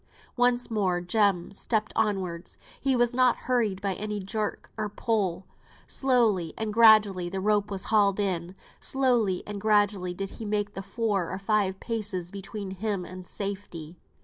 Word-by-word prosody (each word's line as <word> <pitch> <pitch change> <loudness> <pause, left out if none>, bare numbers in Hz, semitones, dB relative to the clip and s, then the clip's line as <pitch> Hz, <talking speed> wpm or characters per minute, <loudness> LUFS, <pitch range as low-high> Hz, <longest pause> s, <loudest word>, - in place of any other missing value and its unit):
Once 245 0 +2
more 190 -5 +1
Jem 185 0 +1
stepped 215 +1 -1
onwards. 190 -6 -2 0.2
He 270 -1 +1
was 240 0 +2
not 250 -1 +4
hurried 220 -7 +1
by 200 -2 0
any 210 +1 -4
jerk 210 +2 -4
or 215 -1 -3
pull. 195 -5 -1 0.4
Slowly 225 - +1
and 220 -1 -2
gradually 215 -5 +5
the 190 +2 -3
rope 205 +1 +1
was 195 -2 -4
hauled 200 -2 +4
in, 185 -2 -1 0.2
slowly 240 -8 +1
and 205 -1 -6
gradually 205 -4 +2
did 195 +1 -4
he - - -8
make 205 -1 -1
the 195 - -5
four 200 -4 -1
or 190 - -4
five 195 -1 0
paces 205 -6 -1
between 200 0 -6
him 195 -1 -3
and 185 0 -9
safety. 190 -5 -5
205 Hz, 155 wpm, -27 LUFS, 190-220 Hz, 0.4 s, gradually